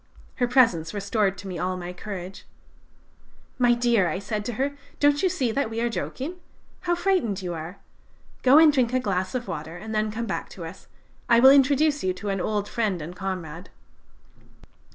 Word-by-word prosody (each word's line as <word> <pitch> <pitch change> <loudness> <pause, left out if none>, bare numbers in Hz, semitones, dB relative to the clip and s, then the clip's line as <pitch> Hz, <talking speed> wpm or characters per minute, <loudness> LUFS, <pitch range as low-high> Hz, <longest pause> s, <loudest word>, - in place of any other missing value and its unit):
Her 245 - +1
presence 220 -10 +3
restored 200 -1 0
to 195 - -9
me 180 -3 -5
all 185 0 -1
my 180 0 -6
courage. 190 0 -8 1.1
"'My 240 -1 +4
dear,' 225 -8 +2
said 210 +2 -3
I - - -9
to 240 - -3
her, 275 +5 -1 0.2
'don't 290 0 +3
you 375 - +3
see 255 -8 -1
that 275 0 -1
we 225 0 -4
are 240 +1 +1
joking? 285 +9 -4 0.4
How 345 -1 0
frightened 345 - 0
you 175 -1 -3
are! 165 +4 -7 0.6
Go 265 +3 +6
and 315 -1 +7
drink 255 -3 +1
a 255 - +3
glass 190 -3 -2
of 245 -3 -3
water 160 -1 -6
and 220 +3 -7
then 215 0 0
come 225 +2 -4
back - - -4
to - - -6
us; - - -11 0.4
I 235 -1 +6
will 265 +2 +9
introduce 285 +2 +4
you 185 0 +1
to 200 +3 -6
an 195 -1 -1
old 205 0 -1
friend 210 -6 -1
and 165 +3 -7
comrade.' 180 -3 -5
215 Hz, 195 wpm, -25 LUFS, 185-255 Hz, 1.1 s, will